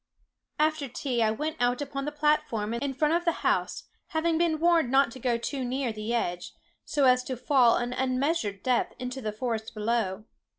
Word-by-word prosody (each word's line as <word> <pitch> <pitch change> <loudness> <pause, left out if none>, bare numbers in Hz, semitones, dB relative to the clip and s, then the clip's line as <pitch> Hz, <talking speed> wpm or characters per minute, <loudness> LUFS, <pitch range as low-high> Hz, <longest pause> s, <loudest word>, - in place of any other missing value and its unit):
"After 310 -1 +1
tea, 250 -1 -2
I 220 - +4
went 305 +8 -3
out 245 0 +1
upon 275 -1 -4
the 295 - -2
platform 295 -8 0
in 270 +3 -2
front 300 +3 +2
of 345 +1 +1
the 340 - +3
house, - - 0 0.2
having 325 -1 0
been 335 -2 +2
warned 335 -5 +3
not 270 -1 +4
to 260 - -10
go 240 -1 +1
too 265 +3 -3
near 255 -1 -2
the 215 +1 -4
edge, 180 -7 -2 0.3
so 285 -2 +1
as 250 0 +5
to 255 - -4
fall 250 -2 +4
an 240 +1 -2
unmeasured 255 - -1
depth 250 -1 +1
into 250 +1 -5
the 215 -2 -2
forest 220 0 -4
below. 215 -2 -1
255 Hz, 195 wpm, -28 LUFS, 235-295 Hz, 0.3 s, as